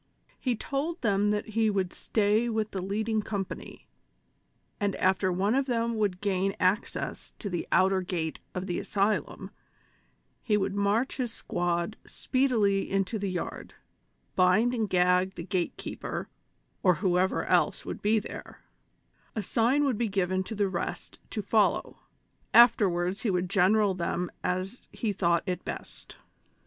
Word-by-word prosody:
He 250 -3 0
told 295 +8 -3
them 205 -1 +2
that 210 +1 -1
he 220 0 +2
would 190 -3 -1
stay 215 +2 +1
with 220 -1 -1
the 190 - -3
leading 215 +3 -1
company, 200 -3 -6 0.9
and 200 -2 0
after 185 0 +2
one 195 +5 +1
of 270 +1 +1
them 235 -2 0
would 205 -4 0
gain 195 -1 0
access 185 +3 -1
to 200 - -5
the 175 - -3
outer 190 0 +4
gate 170 -3 -3 0.2
of 180 0 -3
the 175 -2 -2
asylum 200 +1 -1 0.9
he 215 -4 +2
would 195 -1 -1
march 205 +5 +1
his 250 -4 -2
squad 175 0 -2
spee 265 +1 0
dily 200 -6 +1
into 195 +2 0
the 200 -1 -2
yard, 180 -1 -5 0.6
bind 195 +7 +4
and 225 -4 -1
gag 180 +1 +3
the 170 - -6
gate 185 -3 -1
keeper, - - -5 0.5
or 180 -2 +4
who 180 +2 +1
ever 190 +1 +1
else - - +2
would - - -5
be 215 +2 +3
there; 215 - -7 0.7
a 215 - -2
signal 240 +9 +2
would 255 -6 0
be 235 -2 +1
given 185 -1 0
to 220 - -5
the 205 -1 +1
rest 185 -2 -4
to - - -3
follow, - - +1 0.6
afterwards 195 -6 +5
he 230 - 0
would 180 -1 0
general 200 +1 +4
them 180 0 -2
as 185 +6 -3
he 215 -3 -2
thought 170 -3 +2
it 180 -2 -3
best - - -8
200 Hz, 155 wpm, -28 LUFS, 185-220 Hz, 0.9 s, afterwards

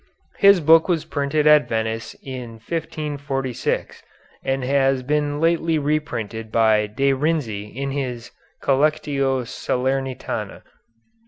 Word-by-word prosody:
His 200 -2 +6
book 160 +3 +5
was 165 -3 +1
printed 145 0 -1
at 150 -1 +6
Venice 110 0 -2
in 125 -3 -7
1546, 140 -1 -3 0.4
and 135 0 -1
has 135 0 +2
been 145 +1 0
lately 165 0 +2
reprinted 120 -8 -2
by 110 -2 +3
De 135 +6 +1
Renzi 130 -8 -1
in 135 +3 -4
his 125 -4 -4 0.3
"Collectio 140 -2 +1
Salernitana." 130 +1 -3
135 Hz, 105 wpm, -22 LUFS, 125-150 Hz, 0.4 s, His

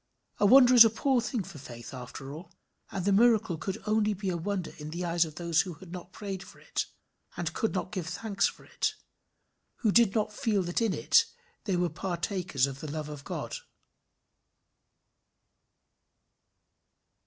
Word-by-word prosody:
A 205 - +5
wonder 255 +2 +8
is 240 -2 +11
a 225 - +5
poor 250 +3 +1
thing 235 -2 -2
for 170 -5 -10
faith 120 -1 -10
after 135 +2 -8
all; 160 +5 -10 0.4
and 190 -2 -4
the 200 - +3
miracle 220 -3 +4
could 185 +4 -4
be - - -11
only 210 -2 +1
a 180 - -1
wonder 185 +1 -3
in 150 0 -6
the 175 +3 -4
eyes 170 0 +2
of 155 -2 -10
those 170 -2 +2
who 180 -4 -6
had 170 +3 -13
not 180 0 -8
prayed 195 -2 -5
for - - -13
it, - - -3 0.5
and 165 -2 -2
could 220 +3 -1
not 185 +1 -2
give 185 -6 -4
thanks 205 -3 0
for - - -10
it; - - -1 0.9
who 220 - +3
did 230 -1 +4
not 215 -1 0
feel 210 -5 0
that 175 +5 -1
in 225 -4 +1
it - - +4 0.4
they 195 - 0
were 175 0 +2
partakers 175 - -1
of 135 -1 -6
the 155 - -6
love 150 0 -4
of 145 -2 -8
God. - - -4
185 Hz, 175 wpm, -29 LUFS, 165-215 Hz, 0.9 s, is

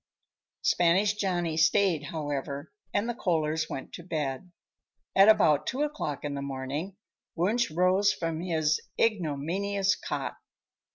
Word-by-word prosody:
Spanish 185 +4 +3
Johnny 180 -6 -1
stayed, 160 -1 +3
however, 145 -1 -4 0.2
and 205 +3 0
the 240 - -1
Kohlers 160 -6 0
went 135 - -6
to 170 - -8
bed. 155 0 -3 0.6
At 195 +2 +7
about 150 -9 +4
two 270 +3 0
o'clock 290 - -3
in 145 - -2
the 140 - -4
morning 140 +7 -4 0.4
Wunsch 215 +8 +1
rose 185 +5 +3
from 165 -2 -3
his 160 -3 +1 0.2
ignominious 195 +1 +1
cot. - - -4
170 Hz, 125 wpm, -28 LUFS, 150-200 Hz, 0.6 s, At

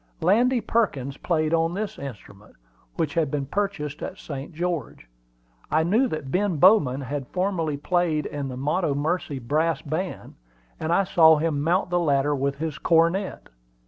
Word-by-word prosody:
Landy 235 +8 +3
Perkins 140 - -1
played 155 -2 0
on 165 +1 +1
this 215 +1 -4
instrument, 105 -6 -10 0.4
which 155 -3 -1
had 160 -4 +1
been 140 -1 -2
purchased 155 -4 -3
at 190 - -5
St. 140 -1 -7
George. 165 - -4 0.6
I 160 +1 +2
knew 220 +10 +3
that 155 - -5
Ben 185 -1 +1
Bowman 145 -7 +5
had 135 0 -4
formerly 180 -6 -1
played 165 0 0
in 145 -1 -4
the 130 -1 -6
Montomercy 150 +1 -1
Brass 155 +6 0
Band, 165 +5 -4 0.5
and 160 - -2
I 185 +3 +4
saw 160 -4 +6
him 150 -2 0
mount 175 +4 +1
the 175 - +2
ladder 145 -3 +2
with 140 0 -1
his 155 -1 -4
cornet. 170 +4 +1
160 Hz, 155 wpm, -24 LUFS, 145-180 Hz, 0.6 s, saw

